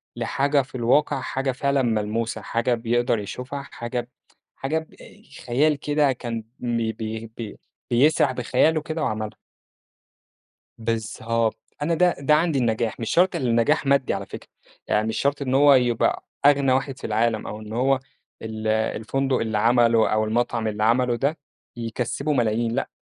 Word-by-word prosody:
لحاجة 140 +1 +1
في 135 +1 -12
الواقع 135 +3 +2
حاجة 135 0 -2
فعلًا 140 +1 0
ملموسة 110 -1 -1
حاجة 115 +4 0
بيقدر 120 0 +1
يشوفها 125 +7 -6
حاجة 120 -2 -4
ب 120 - -16 0.5
حاجة 155 +4 -1
بأي 200 +6 -15 0.2
خيال 145 +5 +3
كده 145 -2 +2
كان 115 -3 -4 0.2
م 120 -1 -1
بي 110 -1 0
بيه 110 +1 -5
بي 110 -3 -7 0.3
بيسرح 135 +3 +4
بخياله 130 +5 +2
كده 155 +1 -4
وعملها. 110 -1 -3 1.4
بالضبط 115 0 -1 0.2
أنا 165 +3 +1
ده 180 +1 +3
ده 140 +2 +4
عندي 155 -3 +1
النجاح 115 -1 0
مش 115 - -3
شرط 180 +1 +3
اللي 130 -7 -1
النجاح 120 +7 +2
مادّي 140 -1 +2
على - - -4
فكرة، - - -10 0.4
يعني 105 +1 +1
مش 110 - -2
شرط 140 +1 0
إن 130 -2 -1
هو 140 +1 +7
يبقى 125 -3 +2 0.2
أغنى 140 -2 +5
واحد 135 0 -1
في - - -5
العالم 110 0 0
أو 105 - -6
إن 110 0 -9
هو 130 +3 +2 0.4
ال 110 0 -5
الفندق 110 +5 0
اللي 110 -2 -1
عمله 115 0 +4
أو 110 0 +2
المطعم 115 0 0
اللي 105 0 -2
عمله 120 +2 +3
ده 140 +6 0 0.4
يكسّبه 125 +5 -2
ملايين 115 -2 +1
لأ، 130 +4 -2
120 Hz, 160 wpm, -24 LUFS, 115-140 Hz, 1.4 s, هو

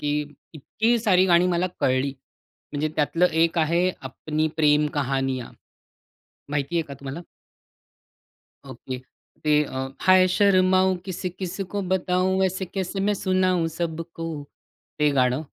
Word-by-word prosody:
की 145 0 -1 0.4
इतकी 225 - 0
सारी 190 -4 +3
गाणी 175 0 +4
मला 175 +1 +1
कळली, 130 +1 +1 0.6
म्हणजे 150 +1 -1
त्यातलं 165 +4 +2 0.2
एक 165 0 +1
आहे, 170 +3 +2 0.2
अपनी 155 +5 -2
प्रेम 150 -1 +4
कहानियाँ 135 -3 -2 1.0
माहिती 145 +3 -2
आहे - - +2
का 140 - -7
तुम्हाला? 140 +5 -6 1.5
ओके. 130 0 -7 0.5
ते 150 0 +4
अ, 130 -1 -4
हाय 185 0 +6
शर्माऊ 185 -1 +3
किसी-किसी 185 +1 -5
को 205 - -1
बताऊ, 185 +1 +1
ऐसे 190 +1 -1
कैसे 190 +1 -4
मैं 205 +1 +1
सुनाऊं 185 -3 +1
सबको 165 0 -4 0.7
ते 150 -1 +3
गाणं. 125 0 +3
170 Hz, 125 wpm, -24 LUFS, 145-185 Hz, 1.5 s, हाय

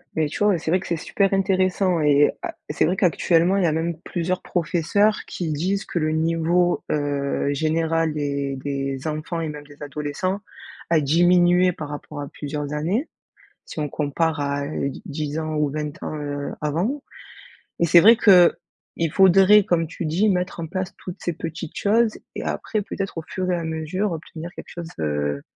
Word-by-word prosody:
Beh 155 -1 +1
tu 180 - -2
vois 205 -3 +4
c'est 160 0 -3
vrai 185 - +3
que 190 - -9
c'est 170 - 0
super 195 +5 0
intéressant 185 -2 +2
et 145 -1 +4
à - - -5
c'est 150 - +1
vrai 175 +4 +1
qu'actuellement 180 0 +3
il 195 - +2
y - - +3
a - - +2
même 160 +1 -2
plusieurs 180 +1 -2
professeurs 180 +5 +1
qui 170 -3 -3
disent 185 +7 -1
que 175 - -2
le 155 -1 0
niveau, 165 +2 +1
heu, 145 -1 -1
général 160 +1 0
des 140 -2 -2
des 135 0 -4
enfants 155 +2 -3
et 160 - -2
même 150 -1 -8
des 145 0 -16
adolescents 150 +7 -3 0.5
a 165 -1 +4
diminué 175 +4 +4
par 155 -3 -7
rapport 145 0 -7
à 145 - -5
plusieurs 145 0 -5
années, 180 - -1 0.6
si - - -7
on 150 - -1
compare 150 +2 -1
à 140 0 -1
d 140 -2 -2
dix 150 +1 -3
ans 155 -1 -3
ou 150 -1 +1
20 150 0 -4
ans, - - -4
heu, 145 -1 -4
avant. 180 - -1 0.8
Et 170 - +4
c'est 170 +1 +7
vrai 225 +6 +8
qu'il 175 -4 +3
faudrait 195 +2 +6
comme 165 -2 +1
tu 165 +1 -5
dis 180 +8 +2
mettre 180 -3 -1
en 165 - -3
place 185 +2 -4
toutes 180 - -9
ces 175 - -1
petites 165 0 -7
choses 220 +2 +2 0.2
et - - -5
après 215 -2 -2
peut-être, 195 -3 -5
au - - -3
fur 185 -1 -3
et 180 - +2
à 170 - -4
mesure 160 +5 -2
obtenir 165 +1 -7
quelque - - -10
chose, 170 -1 -7
heu, 75 -2 -1
165 Hz, 190 wpm, -23 LUFS, 150-180 Hz, 0.8 s, vrai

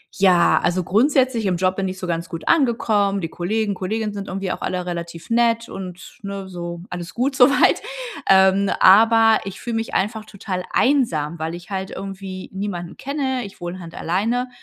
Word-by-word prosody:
ja, 185 -3 +4
also 180 +1 0
grundsätzlich 255 - +2
im 180 - +1
Job 185 +1 +1
bin 195 - -1
ich 185 0 -5
so - - -5
ganz 170 -1 -2
gut 165 -3 -7
angekommen, 220 -8 +2
die 165 - -3
Kollegen, 205 +5 -1
Kolleginnen 210 +3 -3
sind 200 -1 -6
irgendwie 190 0 -3
auch - - -5
alle 180 -1 -2
relativ 170 0 -6
nett 230 0 +2
und 185 -2 -9
ne, 200 -1 -6
so 170 -1 -6
alles 175 0 -6
gut 265 +3 0
so 250 0 +7
weit. 280 - +3 0.5
Ähm, 190 +1 +5
aber 225 +3 +6
ich 195 - -7
fühle 235 -2 -3
mich 225 - -4
einfach 215 +3 -1
total 195 -3 -5
einsam, 170 - +1
weil 160 +1 -3
ich 175 +2 -12
halt 190 0 -3
irgendwie 195 -1 -7
niemanden 190 -3 -5
kenne. 265 -3 -2
Ich 200 - -12
wohne 175 +2 -5
halt 170 -1 -10
alleine 230 +8 -1
195 Hz, 185 wpm, -21 LUFS, 180-225 Hz, 0.5 s, so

